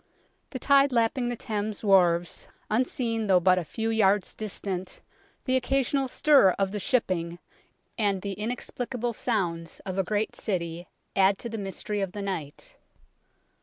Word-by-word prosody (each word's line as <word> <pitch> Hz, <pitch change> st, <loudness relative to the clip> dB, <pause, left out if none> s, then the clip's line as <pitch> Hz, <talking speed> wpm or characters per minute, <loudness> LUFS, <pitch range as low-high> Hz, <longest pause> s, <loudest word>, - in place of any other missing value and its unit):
The 260 Hz, -, -5 dB
tide 275 Hz, +1 st, +4 dB
lapping 240 Hz, +1 st, +1 dB
the 245 Hz, -, -2 dB
Thames 215 Hz, -1 st, -4 dB
wharves, 175 Hz, -4 st, +3 dB, 0.2 s
unseen 230 Hz, -1 st, 0 dB
though 185 Hz, -2 st, +5 dB
but 185 Hz, +1 st, +4 dB
a -, -, -3 dB
few 225 Hz, +8 st, -3 dB
yards 205 Hz, -3 st, +2 dB
distant, 195 Hz, -3 st, -5 dB, 0.5 s
the 260 Hz, -2 st, +1 dB
occasional 270 Hz, +1 st, +1 dB
stir 265 Hz, -8 st, +5 dB
of 195 Hz, -1 st, 0 dB
the 210 Hz, -, -3 dB
shipping, 185 Hz, -9 st, 0 dB, 0.6 s
and 200 Hz, -3 st, +1 dB
the 200 Hz, -1 st, -3 dB
inexplicable 240 Hz, +2 st, -3 dB
sounds 175 Hz, -9 st, -2 dB
of 190 Hz, -1 st, -4 dB
a -, -, +3 dB
great 210 Hz, +3 st, -1 dB
city 175 Hz, -3 st, -3 dB, 0.3 s
add 195 Hz, 0 st, +4 dB
to 235 Hz, -, -6 dB
the 225 Hz, -1 st, -5 dB
mystery 200 Hz, +1 st, -3 dB
of 190 Hz, -2 st, -3 dB
the 205 Hz, -, -5 dB
night. 165 Hz, -7 st, -6 dB
205 Hz, 150 wpm, -27 LUFS, 185-235 Hz, 0.6 s, though